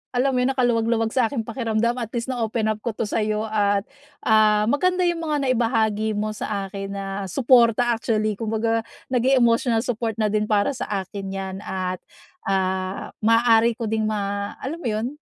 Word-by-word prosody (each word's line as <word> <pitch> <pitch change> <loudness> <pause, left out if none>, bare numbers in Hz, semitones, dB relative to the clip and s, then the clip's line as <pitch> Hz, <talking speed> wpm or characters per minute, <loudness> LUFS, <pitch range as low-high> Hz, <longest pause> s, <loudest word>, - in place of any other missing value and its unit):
alam 265 +2 +2
mo 255 - 0
yun 250 - +2
nakaluwag-luwag 230 -3 +1
sa 250 -3 +2
aking 230 -1 -3
pakiramdam 235 +1 -1
at 230 - -3
least 235 +2 -2
na 250 - -4
open 220 -1 0
up 215 - -4
ko 225 0 -4
to - - -2
sa'yo 215 0 -1
at 205 -2 +1 0.4
ah, 215 -1 +4
maganda 365 +5 +2
yung 340 -2 0
mga 295 -2 0
naibahagi 225 -4 +1
mo 215 +1 -1
sa 200 -2 -4
akin 195 0 -5
na 195 0 -4 0.2
suporta 240 +1 +4
actually 215 -2 -1
kumbaga 225 0 0 0.3
naging 255 +1 +3
emotional 230 -1 +2
support 230 -3 -2
na 215 -2 0
din 215 0 0
para 205 +1 +2
sa 260 - -5 0.2
akin 195 +1 -7
'yan. 190 -1 -4
At, 185 -2 -3 0.5
ah, 190 0 -1
maaari 230 +1 +4
ko 225 -2 -4
ding 220 -1 0
ma 200 -1 -2
alam 310 +6 -4
mo 315 - -4
'yun, 215 +2 -1
225 Hz, 180 wpm, -23 LUFS, 210-240 Hz, 0.5 s, ah